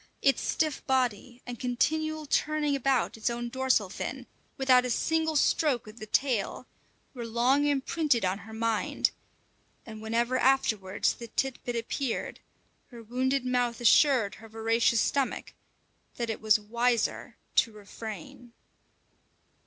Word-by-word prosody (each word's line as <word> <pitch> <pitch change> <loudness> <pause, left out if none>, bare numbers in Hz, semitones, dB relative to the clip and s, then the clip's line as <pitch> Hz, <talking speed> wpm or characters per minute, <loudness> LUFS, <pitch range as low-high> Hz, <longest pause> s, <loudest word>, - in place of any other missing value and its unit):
Its 275 -3 +3
stiff 310 -3 -1
body, 250 -2 -1
and 245 -2 -7
continual 310 +5 -1
turning 295 0 +1
about 270 -1 +1
its 220 - 0
own 240 0 -4
dorsal 260 -5 +1
fin, 255 +7 -6 0.3
without 255 -2 +5
a 250 - -2
single 320 +5 0
stroke 290 -3 +2
of 215 +2 -12
the 215 - -8
tail, 250 -1 0 0.5
were 245 -3 -6
long 245 +5 +2
imprinted 285 - +1
on 185 +2 -1
her 215 +3 -12
mind; 225 -1 0 0.7
and 220 -1 -9
whenever 235 +3 0
afterwards 215 -8 +2
the 235 - -9
"tit 265 +3 -2
bit" 245 - -3
appeared, 235 +2 -3 0.5
her 235 -2 -12
wounded 255 +3 -1
mouth 245 -1 0
assured 240 -3 +4
her 225 - -12
voracious 225 +1 +2
stomach 275 +3 -1 0.6
that 235 -2 -2
it 220 - -6
was 215 -1 +4
wiser 235 +2 -1 0.2
to 235 - +3
refrain. 215 +2 -9
245 Hz, 135 wpm, -28 LUFS, 225-270 Hz, 0.7 s, without